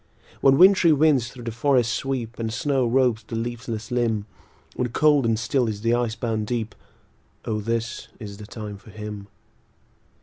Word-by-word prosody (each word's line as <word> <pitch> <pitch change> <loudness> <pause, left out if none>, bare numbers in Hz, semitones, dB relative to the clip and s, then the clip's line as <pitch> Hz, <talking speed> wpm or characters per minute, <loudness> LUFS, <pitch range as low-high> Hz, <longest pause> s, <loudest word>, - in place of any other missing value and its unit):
When 135 0 +5
wintry 185 -2 +7
winds 145 -5 +3
thro' 125 -1 -11
the 115 - -3
forests 120 0 +2
sweep, 125 -4 -3
And 110 -1 -2
snow 130 +2 0
robes 120 -2 +2
the 110 +2 -7
leafless 115 -1 -4
limb; 115 -4 0 0.5
When 125 - -1
cold 145 0 +3
and 115 -1 +2
still 120 +2 0
is 105 -1 -5
the 115 +1 +2
ice 120 -2 0
bound 110 -2 -2
deep, 115 -2 -2 0.7
O 110 -1 -1
this 115 +2 -3
is 100 -3 -8
the 105 0 -10
time 105 -2 -7
for 110 - -16
him. 105 -1 -7
115 Hz, 170 wpm, -24 LUFS, 110-125 Hz, 0.7 s, wintry